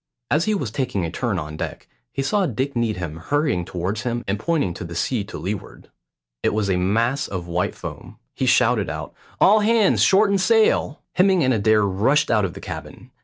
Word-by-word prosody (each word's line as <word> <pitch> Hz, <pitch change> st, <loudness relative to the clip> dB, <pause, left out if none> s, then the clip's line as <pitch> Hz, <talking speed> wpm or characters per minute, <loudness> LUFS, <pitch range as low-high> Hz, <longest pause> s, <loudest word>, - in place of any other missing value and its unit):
As 155 Hz, +4 st, +2 dB
he 215 Hz, -, +1 dB
was 130 Hz, -, -3 dB
taking 110 Hz, -8 st, -2 dB
a 80 Hz, -, -4 dB
turn 115 Hz, +2 st, -2 dB
on 75 Hz, -2 st, -5 dB
deck, -, -, -6 dB, 0.2 s
he 135 Hz, -, -2 dB
saw 195 Hz, +6 st, +1 dB
Dick 130 Hz, +2 st, -3 dB
Needham 90 Hz, -9 st, -2 dB
hurrying 140 Hz, -, 0 dB
towards 95 Hz, +6 st, -3 dB
him 120 Hz, -1 st, -2 dB
and 100 Hz, +1 st, -1 dB
pointing 145 Hz, -, 0 dB
to -, -, -7 dB
the 85 Hz, -1 st, -7 dB
sea 110 Hz, +5 st, -1 dB
to 105 Hz, -, -8 dB
leeward. 100 Hz, +3 st, -6 dB, 0.5 s
It -, -, 0 dB
was 100 Hz, -2 st, 0 dB
a -, -, +2 dB
mass 115 Hz, +10 st, +1 dB
of 90 Hz, -3 st, -5 dB
white 85 Hz, +1 st, -2 dB
foam. -, -, -9 dB, 0.2 s
He -, -, -2 dB
shouted -, -, +3 dB
out, -, -, -6 dB, 0.3 s
"All 210 Hz, +3 st, +6 dB
hands 215 Hz, -1 st, +3 dB
shorten 200 Hz, 0 st, +4 dB
sail!" 215 Hz, -5 st, +2 dB
Hemming 185 Hz, -2 st, +3 dB
and 130 Hz, 0 st, +3 dB
Adair 110 Hz, -1 st, +3 dB
rushed 115 Hz, +10 st, +2 dB
out 105 Hz, -3 st, +3 dB
of 90 Hz, -, -5 dB
the -, -, -8 dB
cabin. -, -, -9 dB
115 Hz, 200 wpm, -22 LUFS, 95-155 Hz, 0.5 s, All